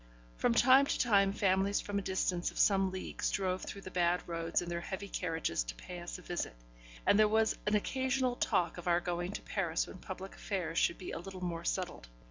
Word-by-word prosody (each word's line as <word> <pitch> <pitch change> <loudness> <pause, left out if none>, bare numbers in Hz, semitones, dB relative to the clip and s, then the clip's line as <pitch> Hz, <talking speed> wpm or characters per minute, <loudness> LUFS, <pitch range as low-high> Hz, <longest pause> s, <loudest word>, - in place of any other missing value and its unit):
From 235 - +2
time 265 +4 +6
to - - 0
time 200 -5 +4
families 195 0 +2
from 205 0 -2
a - - -3
distance 185 -2 0
of - - -12
some 195 -2 +4
leagues 185 0 -3
drove 185 -1 -1
through 200 - -7
the 185 - -9
bad 175 0 +1
roads 165 -1 0
in 175 - -4
their 170 0 -2
heavy 190 +3 -5
carriages 160 - -1
to - - -6
pay 180 -1 -8
us 175 0 -6
a 180 - -13
visit, 175 - -3 0.5
and 205 - +5
there 215 - +7
was 220 +1 +3
an 210 - +3
occasional 260 +3 0
talk 175 -6 +1
of 175 - -8
our 175 0 +4
going 175 +1 -2
to - - -6
Paris 170 -5 -1
when 185 - -10
public 190 +1 -7
affairs 180 -5 -2
should 170 - +2
be 185 - -6
a - - -4
little 185 +1 -8
more 170 -2 -3
settled. - - -2
185 Hz, 220 wpm, -33 LUFS, 175-200 Hz, 0.5 s, there